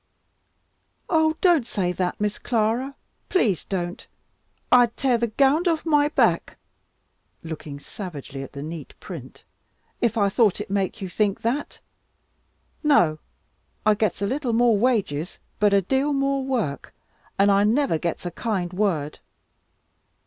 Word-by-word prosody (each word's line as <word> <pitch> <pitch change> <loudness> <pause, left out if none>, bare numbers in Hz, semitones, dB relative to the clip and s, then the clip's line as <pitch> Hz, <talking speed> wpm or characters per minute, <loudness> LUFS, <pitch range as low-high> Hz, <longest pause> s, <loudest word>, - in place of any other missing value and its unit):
"Oh 315 -1 +3
don't 335 -10 +4
say 185 -6 -1
that, 180 0 -2
Miss 210 0 -1
Clara, 240 +4 0 0.3
please 220 - +1
don't! 175 -2 -4 0.6
I'd 245 -2 +5
tear 255 -4 +2
the 235 - +1
gownd 280 - +2
off 325 -1 0
my 295 -2 +3
back" - - +1 0.9
looking 155 -3 -7
savagely 145 -6 -8
at 135 - -9
the 140 -1 -6
neat 160 0 -8
print - - -10 0.6
"if 235 -1 +1
I 200 -2 +3
thought 205 0 +2
it - - -6
make 200 +1 -1
you - - -3
think 200 +2 0
that. 255 +6 -2 1.0
No, 175 - +3 0.7
I 215 - +6
gets 210 -2 -1
a - - +2
little 255 +2 -1
more 235 -1 +4
wages, 200 - 0 0.2
but 210 -1 +4
a 200 -1 +3
deal 270 +8 +1
more 275 0 0
work, 235 - -3 0.4
and 200 +1 +5
I 200 +1 +4
never 225 - +2
gets 170 +2 -3
a 175 - -3
kind 185 -3 -2
word. 175 -7 -1
215 Hz, 140 wpm, -24 LUFS, 180-265 Hz, 1.0 s, I